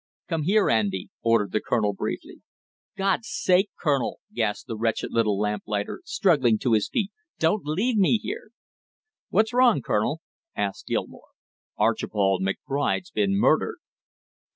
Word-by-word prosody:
"Come 165 Hz, -4 st, -1 dB
here, 205 Hz, +3 st, +3 dB
Andy!" 100 Hz, -4 st, 0 dB
ordered 115 Hz, -4 st, +2 dB
the 110 Hz, -, 0 dB
colonel 105 Hz, -4 st, 0 dB
briefly. -, -, -5 dB, 0.6 s
"God's 195 Hz, +3 st, 0 dB
sake, 190 Hz, +2 st, +2 dB
Colonel!" 140 Hz, -5 st, 0 dB
gasped 110 Hz, -3 st, -1 dB
the 115 Hz, -, -5 dB
wretched 115 Hz, 0 st, -1 dB
little 110 Hz, -3 st, +2 dB
lamplighter, 105 Hz, -, -2 dB
struggling 145 Hz, -, +3 dB
to 120 Hz, +1 st, 0 dB
his 105 Hz, -2 st, +2 dB
feet, 210 Hz, -4 st, -1 dB, 0.3 s
"don't 165 Hz, +6 st, +1 dB
leave 205 Hz, +11 st, 0 dB
me 200 Hz, +3 st, +4 dB
here 460 Hz, -, -6 dB, 0.4 s
" 435 Hz, 0 st, -66 dB
"What's 220 Hz, +2 st, +2 dB
wrong, 245 Hz, -, +4 dB
Colonel?" 145 Hz, +10 st, 0 dB, 0.3 s
asked 100 Hz, -1 st, -3 dB
Gilmore. -, -, -4 dB, 0.5 s
"Archibald 95 Hz, -2 st, +1 dB
McBride's 140 Hz, -, -1 dB
been 200 Hz, -1 st, +1 dB
murdered!" -, -, +2 dB
140 Hz, 135 wpm, -25 LUFS, -, 0.6 s, me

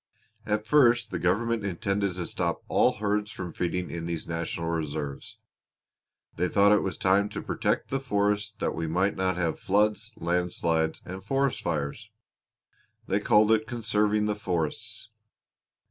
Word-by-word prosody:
At 105 Hz, 0 st, 0 dB
first 120 Hz, -4 st, +4 dB
the 90 Hz, -, -2 dB
government 110 Hz, +6 st, +1 dB
intended 100 Hz, 0 st, -1 dB
to 90 Hz, -1 st, -3 dB
stop -, -, -2 dB
all -, -, +3 dB
herds 105 Hz, 0 st, -1 dB
from 90 Hz, -5 st, -6 dB
feeding 90 Hz, 0 st, -2 dB
in 85 Hz, 0 st, -4 dB
these 85 Hz, -2 st, -4 dB
National 85 Hz, 0 st, -3 dB
Reserves. 75 Hz, -3 st, -4 dB, 1.0 s
They 90 Hz, +2 st, +1 dB
thought 100 Hz, +2 st, +4 dB
it 105 Hz, -, +5 dB
was 95 Hz, -, -3 dB
time 100 Hz, +2 st, +3 dB
to -, -, -5 dB
protect -, -, -1 dB
the 135 Hz, -, +1 dB
forests 105 Hz, -3 st, 0 dB
that -, -, -1 dB
we 80 Hz, 0 st, -3 dB
might 95 Hz, +5 st, +1 dB
not 95 Hz, -1 st, 0 dB
have 85 Hz, -3 st, -1 dB
floods, 105 Hz, +2 st, +1 dB
landslides, 85 Hz, -2 st, 0 dB
and 95 Hz, +1 st, -7 dB
forest 135 Hz, -1 st, 0 dB
fires. 75 Hz, -4 st, -3 dB, 1.0 s
They -, -, +1 dB
called 105 Hz, +1 st, +4 dB
it 110 Hz, 0 st, +3 dB
conserving 105 Hz, -3 st, +1 dB
the 105 Hz, -, +1 dB
forests. 110 Hz, +4 st, -3 dB
100 Hz, 150 wpm, -27 LUFS, 85-105 Hz, 1.0 s, it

